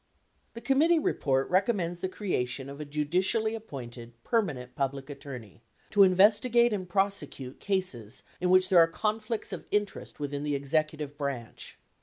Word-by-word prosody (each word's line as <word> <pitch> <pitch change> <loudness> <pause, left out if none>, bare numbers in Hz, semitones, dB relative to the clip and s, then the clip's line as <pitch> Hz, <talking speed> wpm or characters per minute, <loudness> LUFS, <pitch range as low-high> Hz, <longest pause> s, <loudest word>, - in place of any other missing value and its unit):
The 230 - -7
committee 290 +8 +4
report 135 - +1
recommends 185 -3 +1
the 185 - -2
creation 135 -10 -2
of 140 +2 -8
a - - -5
judicially 180 +10 0
appointed 120 - -8
permanent 145 - -1
Public 135 +1 -3
Attorney 125 -7 -9 0.3
to 205 - +4
investigate 215 +5 +5
and 185 -3 -4
prosecute 175 -9 -1
cases 185 - -2 0.2
in 180 - 0
which 185 0 +5
there 180 - +6
are 165 - +7
conflicts 215 +5 -2
of - - -7
interest 205 -5 -2
within 145 -1 -3
the 145 -1 0
executive 150 +1 -2
branch. 135 -5 -5
170 Hz, 145 wpm, -29 LUFS, 140-205 Hz, 0.3 s, are